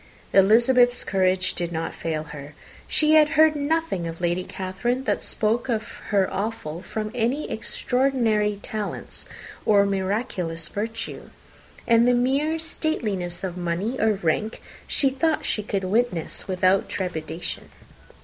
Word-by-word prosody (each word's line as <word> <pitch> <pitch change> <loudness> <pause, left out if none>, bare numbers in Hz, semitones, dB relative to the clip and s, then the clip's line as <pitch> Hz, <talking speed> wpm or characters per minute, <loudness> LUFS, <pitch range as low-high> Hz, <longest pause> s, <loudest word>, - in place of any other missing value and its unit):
Elizabeth's 240 +5 +5
courage 185 -1 +1
did 175 -1 -2
not 165 0 -3
fail 155 -2 -3
her. 150 -1 -10 0.3
She 310 0 +3
had 305 -1 +6
heard 310 0 +6
nothing 290 - -1
of 165 0 -6
Lady 175 +1 0
Catherine 195 +9 -3
that - - 0
spoke 225 +3 +1
her 215 -4 -1
awful 190 -5 -3
from 215 +1 -4
any 250 +5 -1
extraordinary 225 -4 0
talents 215 -2 -6 0.4
or 200 -1 +4
miraculous 190 -4 -2
virtue, 225 +2 -5 0.6
and 230 0 +5
the 245 - +4
mere 275 +6 +1
stateliness 215 - -3
of 185 -2 -4
money 180 +7 -2
and 215 -4 +1
rank 210 +7 0 0.3
she 275 -2 +2
thought 315 +3 0
she 215 - 0
could 200 -2 -2
witness 195 -3 -1
without 185 0 +2
trepidation. 170 -2 -4
210 Hz, 130 wpm, -24 LUFS, 180-245 Hz, 0.6 s, had